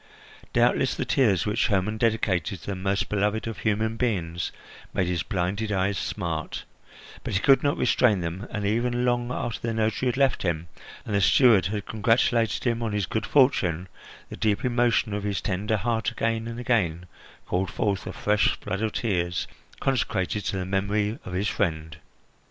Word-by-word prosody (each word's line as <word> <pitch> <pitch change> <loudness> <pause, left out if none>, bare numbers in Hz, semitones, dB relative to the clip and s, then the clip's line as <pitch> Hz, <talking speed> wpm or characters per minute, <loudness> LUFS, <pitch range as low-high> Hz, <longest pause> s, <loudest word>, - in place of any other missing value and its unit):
Doubtless - - +2
the - - -2
tears 105 -10 +2
which 105 +2 +1
Hermon 105 +1 0
dedicated 105 -6 0
to - - -12
the - - -2
most 95 +2 -1
beloved 105 +1 0
of 115 -3 -5
human 110 +1 0
beings 85 -9 -1 0.4
made 95 - +2
his 90 -2 -1
blinded 100 +3 -2
eyes 95 0 +1
smart, 85 -6 -3 0.6
but - - -3
he - - +3
could 135 +3 +5
not 145 0 +1
restrain 120 -4 +3
them, 85 +4 -4
and 105 -1 -3
even 120 +3 +1
long 120 0 0
after 120 -2 -3
the 115 - -1
notary 110 +3 0
had 125 - 0
left 135 -1 +2
him, 85 -2 -2 0.4
and 110 - -4
the 100 - +2
steward 100 -1 +5
had 105 0 -4
congratulated 115 0 +1
him 120 -2 0
on 115 -2 -2
his 105 -2 0
good 110 +2 -2
fortune, 95 - +3 0.4
the - - -8
deep 105 +1 0
emotion 120 -3 +2
of 105 - -2
his 100 -1 -1
tender 105 +3 -1
heart 115 +2 0
again 115 0 -1
and 115 0 -6
again 90 -9 0 0.4
called 90 +1 -1
forth 100 -1 -1
a - - -3
fresh 105 0 +1
flood 95 +3 -4
of 110 -1 -1
tears 90 -7 -1 0.3
consecrated 105 -6 0
to 100 - -2
the 90 - -2
memory 100 +3 0
of 90 - -7
his 95 +3 0
friend. 80 -7 -2
105 Hz, 180 wpm, -26 LUFS, 95-115 Hz, 0.6 s, could